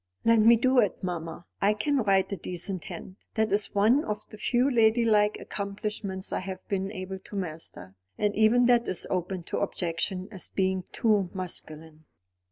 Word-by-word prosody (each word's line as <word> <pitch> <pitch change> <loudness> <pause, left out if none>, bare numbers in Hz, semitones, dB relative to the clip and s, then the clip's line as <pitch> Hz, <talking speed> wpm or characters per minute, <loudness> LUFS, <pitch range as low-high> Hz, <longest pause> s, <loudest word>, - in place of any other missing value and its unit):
"Let 230 0 +5
me 230 +2 +7
do 255 +2 +3
it, 205 -5 +1
mamma. 170 -2 -4 0.2
I 205 +2 +3
can 285 +7 0
write 195 -5 +2
a - - 0
decent 180 +1 -4
hand. 185 - -8 0.2
That 220 0 +1
is 205 +1 +1
one 225 +9 +4
of 210 0 -4
the 215 - -11
few 245 +3 +2
ladylike 220 -4 +3
accomplishments 200 -1 -4
I - - 0
have 185 0 -7
been 195 0 -2
able 190 -1 -6
to 200 - -12
master; 160 - -6 0.2
and 205 -1 0
even 220 +3 +4
that 240 -1 +4
is 185 - 0
open 185 0 -2
to - - -3
objection 185 +2 -2
as 190 -4 -5
being 190 -1 0
too 210 -5 +2
masculine." 160 -3 -7
200 Hz, 175 wpm, -28 LUFS, 185-220 Hz, 0.2 s, me